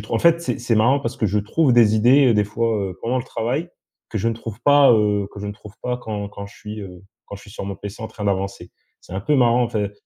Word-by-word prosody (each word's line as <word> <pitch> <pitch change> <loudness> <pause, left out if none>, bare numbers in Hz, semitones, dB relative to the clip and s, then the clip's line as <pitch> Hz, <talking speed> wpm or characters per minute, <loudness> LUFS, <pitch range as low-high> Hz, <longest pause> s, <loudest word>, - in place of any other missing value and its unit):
tr 110 - -10
en - - +2
fait, 170 0 +4
c'est 125 -7 -2
c'est 120 -2 +1
marrant 125 +6 +3
parce 115 -3 -4
que 110 - 0
je 105 +1 0
trouve 130 +6 +1
des 110 -2 +5
idées, 130 +5 +5
heu, 115 - +3
des 105 0 +3
fois, 115 +3 -1 0.2
heu, 90 - -11
pendant 125 +3 0
le 120 - -4
travail, 135 +10 -3 0.4
que 110 - -2
je 115 +4 0
ne 115 - -1
trouve 115 0 -8
pas, 145 -3 +6
heu, 105 -2 +2
que 100 - -9
je 105 - -5
ne 100 - -4
trouve 105 0 -14
pas 125 0 -1
quand 105 -3 -5
quand 100 0 -8
je - - -16
suis, 105 0 -8
heu, 90 -1 -10 0.2
quand - - -8
je - - -14
suis - - -14
sur 100 - -7
mon 100 0 -4
PC 100 +2 -8
en - - -3
train 105 - -8
d'avancer. 95 -2 -2 0.3
C'est - - -15
un 95 - -2
peu 150 +8 +1
marrant, 120 -1 +4
en - - -3
fait, 105 -2 -2
110 Hz, 300 wpm, -21 LUFS, 100-120 Hz, 0.4 s, pas